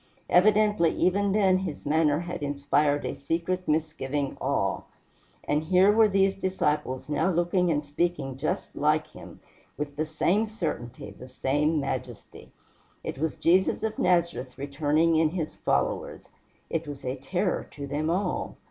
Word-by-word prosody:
Evidently 210 -2 +4
even 200 +2 +2
then 190 -2 +3
his 185 -6 -5
manner 150 0 +2
had 175 -2 -6
inspired 145 0 +1
a - - -2
secret 170 +5 -2
misgiving 150 -3 -1
awe; - - 0 0.6
and 150 +2 0
here 185 +4 +5
were 220 +1 +5
these 195 -1 +3
disciples 150 -9 -1
now 150 +5 +1
looking 175 +1 +1
and 150 -2 +1
speaking 145 -2 -2
just 140 +4 -3
like - - +2
him, - - -13 0.4
with 145 -1 -5
the 155 - 0
same 180 +7 +1
certainty, 150 - -5
the 125 +6 -12
same 150 +5 0
majesty. 140 -1 -6 0.5
It - - -5
was 160 0 -1
Jesus 185 +5 +2
of 220 -1 -2
Nazareth 170 -8 +1
returning 150 +4 +1
in 160 -1 +3
his 165 -2 -4
followers. - - -1 0.4
It 165 -1 -3
was 145 -2 -8
a 130 +1 -2
terror 180 +8 -2
to 140 -1 -7
them 145 +3 -2
all. 185 +4 -2
160 Hz, 150 wpm, -27 LUFS, 145-185 Hz, 0.6 s, here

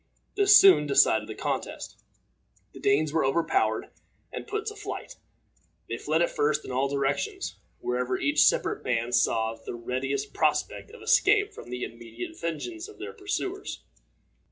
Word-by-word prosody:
This 405 0 +6
soon 385 - +7
decided 110 -6 +4
the 110 - -6
contest. - - -4 0.8
The - - -11
Danes 145 +2 +2
were 160 - +2
overpowered 170 - +1 0.4
and - - -6
put 425 +1 -3
to 425 -1 -4
flight. 430 +4 -7 0.7
They - - -4
fled 160 +3 +1
at - - 0
first 150 +1 0
in - - -6
all 130 +2 +1
directions, 140 - -2 0.2
wherever 125 +1 -1
each 300 +1 +3
separate 440 -4 +2
band 120 0 -1
saw 110 -1 +2
the 115 - -8
readiest 130 +3 -3
prospect - - 0
of 470 - -13
escape 415 0 +3
from - - -11
the 125 0 -4
immediate 115 0 -7
vengeance 330 - -4
of 420 - -14
their 415 +5 -7
pursuers. 395 -1 -4
155 Hz, 155 wpm, -27 LUFS, -, 0.8 s, soon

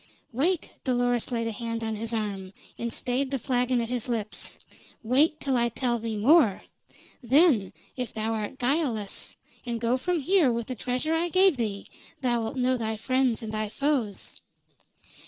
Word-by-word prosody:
"Wait!" 315 +8 0
Dolores 245 -2 0
laid 230 -1 -1
a 230 - -1
hand 230 0 -4
on 220 -1 -2
his 225 +2 -2
arm, 200 -4 -3 0.2
and 235 0 -3
stayed 255 +4 -1
the 275 - -1
flagon 250 0 +1
at 230 -1 -2
his 250 -1 -3
lips. 220 -3 -1 0.5
"Wait, 290 +7 +3
till 270 -2 0
I 240 -1 +2
tell 240 0 -1
thee 225 -1 -3
more. 235 - +4 0.6
Then, 255 - +4 0.2
if 250 -2 -3
thou 220 +1 -2
art 220 +4 -4
guiltless, 245 -6 -1 0.3
and 235 -2 -3
go 235 +2 +1
from 355 +5 0
here 325 -2 +3
with 235 -1 -2
the 255 - -5
treasure 250 +7 -1
I 335 +2 +1
gave 370 -1 +5
thee, 210 -5 -3 0.4
thou'lt 240 -1 0
know 255 0 +2
thy 220 -2 -2
friends 255 0 +1
and 220 -1 -5
thy 215 -1 -2
foes. 260 -5 -2
245 Hz, 170 wpm, -27 LUFS, 225-265 Hz, 0.6 s, gave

